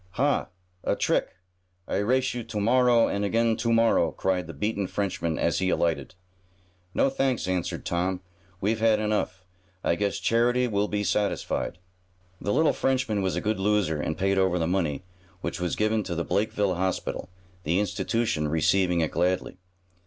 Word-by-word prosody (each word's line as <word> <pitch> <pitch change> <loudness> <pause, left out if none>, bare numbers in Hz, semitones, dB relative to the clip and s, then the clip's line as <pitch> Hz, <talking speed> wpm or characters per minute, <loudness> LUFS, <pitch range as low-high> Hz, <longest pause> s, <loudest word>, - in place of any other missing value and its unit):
"Ha! 140 +2 +1 0.4
A - - +1
trick! - - 0 0.5
I - - -1
race 130 +6 +1
you 120 -1 -4
to 110 -2 -4
morrow 120 +2 +4
and 100 - -1
again 115 +2 +2
to 115 - 0
morrow!" 115 -7 +4
cried 90 -2 -1
the 85 - -7
beaten 100 +5 -1
Frenchman 90 -5 -2
as 85 - +1
he 95 - +1
alighted. 80 -3 0 0.8
"No, - - +4
thanks," 135 -6 0
answered 90 -2 -2
Tom. 90 +1 -1 0.4
"We've 110 +3 0
had 110 -1 +3
enough. 105 -3 -1 0.4
I - - +2
guess 100 +3 -1
charity 120 +2 +2
will 105 -2 0
be 105 0 -1
satisfied." 100 -4 -1 0.6
The 100 - -1
little 155 +8 +3
Frenchman 125 -6 0
was 95 -1 0
a - - -1
good 105 -1 -1
loser, 95 -6 +1
and 80 - -2
paid 95 0 +1
over 95 -2 +2
the 85 - 0
money, 85 -4 -1 0.4
which 95 - -4
was 90 -2 -1
given 110 +1 +1
to 85 - -3
the 85 - -2
Blakeville 105 -2 0
Hospital, 95 -1 -2 0.3
the 85 +4 +1
institution 105 -4 0
receiving 85 +3 +2
it 80 - 0
gladly. 90 0 0
100 Hz, 165 wpm, -26 LUFS, 90-115 Hz, 0.8 s, morrow